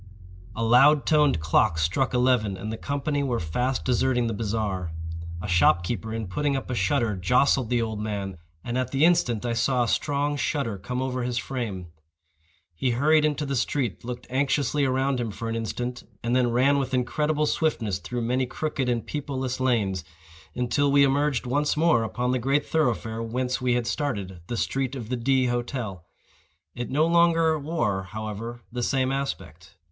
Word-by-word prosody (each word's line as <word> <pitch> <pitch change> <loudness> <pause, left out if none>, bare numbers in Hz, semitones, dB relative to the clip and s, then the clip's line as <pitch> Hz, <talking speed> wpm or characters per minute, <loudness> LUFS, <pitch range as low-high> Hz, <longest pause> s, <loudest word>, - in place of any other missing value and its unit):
A 115 - -2
loud 135 +6 +5
toned 150 - +3
clock 80 +3 +2
struck 85 - +1
eleven, 125 -6 +2
and 110 +4 -5
the - - -2
company 145 +2 -2
were 125 -4 0
fast 125 +11 -1
deserting 125 -1 +2
the 115 - -1
bazaar. 100 -5 -2 0.5
A - - -3
shop 85 -1 +4
keeper, 110 +4 -3
in 110 0 -3
putting 140 +10 -1
up 135 -1 -4
a - - 0
shutter, 110 +1 +1
jostled 125 +5 +2
the 120 -1 +2
old 110 -2 -4
man, 100 -4 -4 0.2
and 120 +2 -2
at 130 -1 -1
the 140 +4 +3
instant 125 -10 +2
I 120 - 0
saw 125 +2 +2
a - - -1
strong 145 +3 0
shudder 125 -9 -1
come 125 +7 -3
over 130 -1 -2
his 120 0 -2
frame. 115 -8 -3 0.9
He 105 +11 -1
hurried 155 +3 +4
into 150 -1 0
the 140 -1 -2
street, 125 -3 -1
looked 125 0 -6
anxiously 140 +1 +1
around 130 0 +1
him 120 -2 -2
for 115 +2 -5
an 115 - -2
instant, 120 +2 -3 0.2
and 120 +1 +1
then 125 -1 +3
ran 135 +4 +3
with 130 -1 -1
incredible 150 +5 0
swiftness 115 - 0
through 120 +6 -4
many 125 +2 0
crooked 140 -2 -2
and 120 -2 -1
people 145 -2 -4
less 130 -1 -2
lanes, 105 -9 +1 0.5
until 125 +3 +1
we 140 0 +6
emerged 140 -1 +1
once 145 +4 0
more 160 -7 +4
upon 120 +4 -1
the 130 - +1
great 140 +4 +1
thoroughfare 115 -7 0
whence 125 +3 -2
we 125 -1 +2
had 120 -1 0
started—the 105 - -3
street 135 +2 -1
of 115 -4 -6
the 125 - 0
D—— 130 +2 +2
Hotel. 120 -6 -3 0.7
It 120 0 -5
no 150 +4 +2
longer 165 -2 +3
wore, 145 - -1
however, 110 +4 -6
the 125 +1 -3
same 130 +1 +1
aspect. 95 - -5
125 Hz, 180 wpm, -25 LUFS, 110-140 Hz, 0.9 s, we